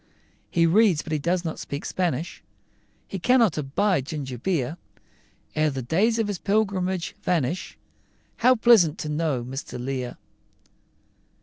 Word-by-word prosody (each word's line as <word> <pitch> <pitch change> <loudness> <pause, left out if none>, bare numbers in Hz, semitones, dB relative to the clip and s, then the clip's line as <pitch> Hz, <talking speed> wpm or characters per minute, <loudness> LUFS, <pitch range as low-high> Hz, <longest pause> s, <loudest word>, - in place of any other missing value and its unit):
He 170 -1 +3
reads, 185 -2 +4
but 160 - -5
he 155 - +1
cannot 170 +1 -1
speak, 140 +1 -5
Spanish, 170 -3 -2 0.7
He 195 - -5
cannot 235 -2 +4
abide 150 +1 0
ginger 135 -6 -5
beer: 160 -1 -1 0.8
Ere 155 0 +2
the 135 -3 -4
days 205 - +2
of 225 -2 0
his 205 -4 -3
pilgrimage 190 -4 0
vanish, 170 -1 -1 0.6
How 255 +1 +5
pleasant 220 -10 +5
to 155 - -4
know 150 -5 -1
Mr. 130 +1 -6
Lear! 125 -1 -4
165 Hz, 130 wpm, -25 LUFS, 140-195 Hz, 0.8 s, How